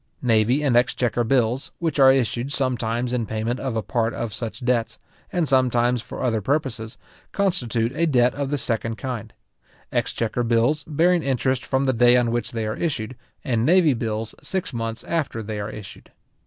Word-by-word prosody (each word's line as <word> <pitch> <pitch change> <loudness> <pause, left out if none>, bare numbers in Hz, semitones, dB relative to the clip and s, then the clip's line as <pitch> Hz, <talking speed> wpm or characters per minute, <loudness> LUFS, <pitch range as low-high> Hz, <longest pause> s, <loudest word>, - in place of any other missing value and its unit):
Navy 120 +4 +3
and 135 -5 +2
exchequer 120 0 +2
bills, 125 +1 +1
which 160 -4 -2
are 135 -1 +8
issued 130 0 0
sometimes 125 -3 -1
in 120 -3 -1
payment 110 +3 -2
of 130 -4 -3
a 110 - -1
part 115 0 -1
of 115 -3 -4
such 120 +1 -5
debts, 120 -2 0 0.3
and 175 -4 0
sometimes 125 -2 +2
for - - -7
other 115 -4 +1
purposes, 125 -3 -2 0.3
constitute 125 - 0
a 165 +2 +1
debt 125 -4 +3
of 140 -1 -3
the 145 - 0
second 115 -3 -1
kind; 115 -2 -5 0.6
exchequer 115 +1 -1
bills 120 +6 +2
bearing 170 +3 +2
interest 130 -2 0
from 135 0 0
the 130 - +2
day 120 +1 +5
on 120 -2 +1
which 120 -1 -2
they 115 -2 -3
are 110 +1 -2
issued, 130 -7 -2 0.3
and 115 -3 0
navy 165 0 +5
bills 110 -2 -2
six 190 -7 -3
months 115 -1 -4
after 145 -9 -2
they 105 0 -5
are 100 +1 -4
issued. 105 -3 -10
120 Hz, 180 wpm, -23 LUFS, 115-135 Hz, 0.6 s, are